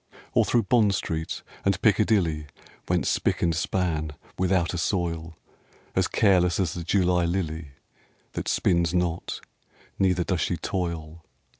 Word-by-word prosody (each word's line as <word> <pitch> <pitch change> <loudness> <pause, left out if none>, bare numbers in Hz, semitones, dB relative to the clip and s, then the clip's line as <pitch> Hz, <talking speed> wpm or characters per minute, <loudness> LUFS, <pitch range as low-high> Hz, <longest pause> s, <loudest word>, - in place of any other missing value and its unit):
Or - - +4
through 120 -1 +2
Bond 105 -1 +3
Street 80 -2 -3 0.2
and - - +2
Piccadilly, 80 -8 +2 0.4
Went - - +2
spick - - +1
and 85 -1 +3
span, 80 -2 -1 0.2
without 90 -2 +1
a 90 - -2
soil, 85 -3 -1 0.6
As - - +3
careless 90 -5 +3
as 95 -2 0
the 85 - -5
July 90 -1 +2
lily 85 -3 -2 0.6
That - - -4
spins 85 -1 +2
not, 90 -1 -1 0.6
neither 90 -2 +3
does 90 -1 -1
she 85 - 0
toil. 85 -3 -4
85 Hz, 135 wpm, -26 LUFS, 80-95 Hz, 0.6 s, Or